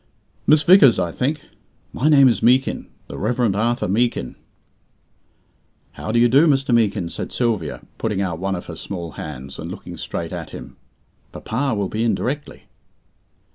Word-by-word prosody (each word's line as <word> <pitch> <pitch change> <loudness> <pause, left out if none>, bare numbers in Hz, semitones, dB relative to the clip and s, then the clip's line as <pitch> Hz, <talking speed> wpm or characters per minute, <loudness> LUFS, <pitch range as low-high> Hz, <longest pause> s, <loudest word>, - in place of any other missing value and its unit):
"Miss 150 0 +5
Vickers, 155 - +7
I 85 - -1
think. 145 - -2 0.5
My 145 +5 +1
name 140 -3 +7
is 120 - +1
Meekin 130 +3 +2 0.2
the - - -8
Reverend 115 -1 0
Arthur 120 +2 0
Meekin." 105 - 0 1.6
"How 110 - -6
do 120 - +1
you 120 +1 +5
do, 140 +7 +5
Mr. 135 -4 +2
Meekin?" 105 -6 +2
said - - -5
Sylvia, 110 - -1 0.2
putting 105 -3 -1
out 90 -4 -2
one 95 +1 -1
of 90 - -7
her 85 - -8
small 85 -2 -6
hands, 70 -3 -8
and - - -6
looking - - -8
straight - - -5
at - - -6
him. - - -10 0.6
"Papa 125 +2 -2
will 100 -2 -1
be 110 +4 -2
in 115 - +2
directly." 145 +3 -4
115 Hz, 165 wpm, -21 LUFS, 95-130 Hz, 1.6 s, Vickers